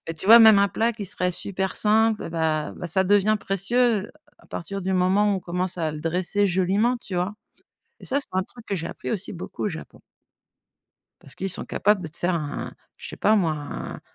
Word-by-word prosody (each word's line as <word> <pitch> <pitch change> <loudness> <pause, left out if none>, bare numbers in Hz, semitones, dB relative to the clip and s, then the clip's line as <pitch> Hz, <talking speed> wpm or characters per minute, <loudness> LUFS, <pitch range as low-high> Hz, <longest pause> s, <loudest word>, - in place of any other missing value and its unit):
et 165 - -3
tu 160 - -4
vois? 230 +3 +10
Même 220 -3 +8
un 200 - +3
plat 225 +5 0
qui 215 -2 -7
serait 180 0 -1
super 190 +1 -3
simple, 220 +1 +2
et - - -6
bah 160 -2 -1
bah - - -5
ça 190 +3 +1
devient 205 +2 +3
précieux 210 +2 0 0.3
à - - -22
partir 195 +4 -6
du 190 0 -2
moment 190 +3 +3
où - - 0
on - - -10
commence 180 +1 -3
à 160 -2 0
le 155 - -7
dresser 180 +5 0
joliment, 195 +6 +1
tu 205 -4 -8
vois? 180 +4 -1 0.7
Et - - -10
ça, 280 +2 +1
c'est - - -3
un 185 +1 +1
truc 235 +4 -14
que 200 - -2
j'ai 165 -1 -4
appris - - -6
aussi 205 -4 -3
beaucoup 175 - -6
au - - +1
Japon. 160 -4 -9 1.2
Parce 135 -3 -10
qu'ils 190 +5 -2
sont - - -3
capables 205 -1 +1
de - - -4
te 155 - -13
faire 180 +1 0
un 150 -3 -4 0.2
je - - -9
sais - - -8
pas 215 +2 +3
moi 170 -7 +2
un 145 -2 -7
190 Hz, 230 wpm, -24 LUFS, 175-210 Hz, 1.2 s, vois